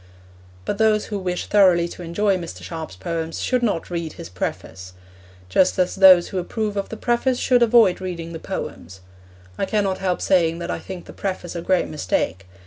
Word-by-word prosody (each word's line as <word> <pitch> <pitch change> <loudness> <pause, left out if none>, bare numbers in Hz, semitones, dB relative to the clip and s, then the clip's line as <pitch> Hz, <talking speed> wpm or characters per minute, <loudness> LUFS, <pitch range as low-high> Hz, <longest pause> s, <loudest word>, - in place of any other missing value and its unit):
But 205 - -3
those 215 -1 +3
who 205 -2 -4
wish 180 -1 -3
thoroughly 185 -4 +4
to - - -10
enjoy 195 +4 +1
Mr. 170 -3 -7
Sharp's 160 - -7
poems 165 - -4
should 250 -1 0
not 200 -8 -1
read 170 -2 -3
his - - -9
preface; 95 0 -6 0.5
just 180 - +2
as 180 -1 +1
those 185 -2 +7
who 190 - -2
approve 210 +3 -3
of 200 -1 -3
the 225 - -6
preface 240 +3 +1
should 250 -1 +3
avoid 225 -6 +5
reading 170 -3 -5
the 165 - -6
poems. 95 - -7 0.6
I - - +1
cannot 200 -3 0
help 185 -2 -1
saying 170 -3 +2
that 170 0 -4
I - - -3
think 185 -2 -8
the - - -11
preface 185 -3 -4
a 170 - -3
great 185 +1 +1
mistake. 95 - -2
180 Hz, 190 wpm, -22 LUFS, 165-205 Hz, 0.6 s, those